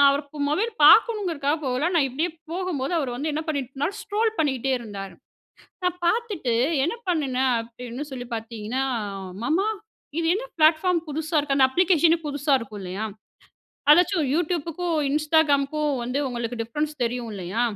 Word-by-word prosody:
அவர் 285 +2 0 0.3
mobile 435 +10 0
பாக்கணுங்கிறதுக்காக 335 - +5
போகல. 260 +7 0
நான் 295 -5 +4
இப்படியே 315 +7 -1 0.2
போகும்போது, 355 -5 -2
அவரு 270 -5 -1
வந்து 300 +5 -2
என்ன 310 +2 -2
பண்ணிட்டுருந்தார். 280 +4 -2
ஸ்க்ரோல் 435 +2 0
பண்ணிட்டே 270 -4 +1
இருந்தாரு. 200 -4 -8 0.7
நான் 360 0 +1
பார்த்துட்டு 400 - 0 0.3
என்ன 340 - -1
பண்ணினேன் 265 -6 +1
அப்படீன்னு 240 +3 -7
சொல்லி 250 -2 -6
பார்த்தீங்கன்னா, 225 +3 -4 0.6
"மாமா 330 - +1 0.5
இது 330 - 0
என்ன 470 +5 -3
பிளாட்ஃபார்ம் 330 +3 +4
புதுசா 315 +2 -2
இருக்கு?" 285 -2 0
அந்த 265 - +6
அப்ளிகேஷனே 340 0 +4
புதுசா 285 0 +1
இருக்கும் 210 -3 -8
இல்லையா? 190 +4 -4 0.9
அதாச்சும் 350 0 +4
YouTube 335 -1 0
க்கும், 340 0 -1
Instagram 305 -1 +3
க்கும் 300 -2 0
வந்து 250 +3 -2
உங்களுக்கு 240 -1 -4
டிஃப்ரன்ஸ் 295 +7 -2
தெரியும் 240 0 -2
இல்லையா? 190 +4 -3
295 Hz, 140 wpm, -24 LUFS, 250-335 Hz, 0.9 s, அந்த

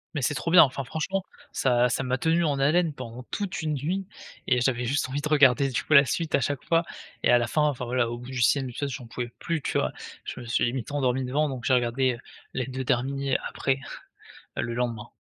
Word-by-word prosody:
Mais 145 - -1
c'est 130 - +1
trop 155 - -3
bien, 175 +1 +9
enfin, 135 0 -1
franchement 185 +7 -2 0.3
ça 125 -1 +2
ça 125 - 0
m'a 130 0 0
tenu 165 +5 +2
en 145 -3 +1
haleine 155 +4 +2
pendant 125 -2 -8
toute 200 -4 -3
une 155 -1 -1
nuit 180 +8 -2 0.4
et 125 -1 +3
j'avais 125 -1 +1
juste 135 +2 0
envie 140 +2 -2
de 150 - -2
regarder 140 -2 +5
du 125 - -2
coup, 155 - 0
la 140 -1 +8
suite 165 +4 -2
à - - +3
chaque 140 +2 -2
fois 165 0 +2 0.4
et - - +4
à 120 - +7
la 120 -1 0
fin, 150 - +1
enfin, 145 -4 0
voilà 120 -1 0
au 120 - -4
bout 125 +2 -9
du 130 -2 -2
6e 130 +2 +3
épisode 140 +4 -3
j'en 130 -3 -7
pouvais 120 +1 -4
plus 165 -3 -2
tu - - -1
vois, - - 0 0.3
je - - -6
me 125 - -8
suis 115 - 0
limite 120 +1 -3
endormi 130 -2 0
devant, 145 +4 +1
donc 130 -2 -6
j'ai 130 - +3
regardé, 125 +1 +2
heu, - - -11 0.4
les 130 - -1
2 130 0 -4
derniers, 135 +2 0
après, 135 0 -1 0.8
heu, - - +1
le 120 - -3
lendemain. 115 -3 -3
130 Hz, 245 wpm, -26 LUFS, 125-145 Hz, 0.8 s, bien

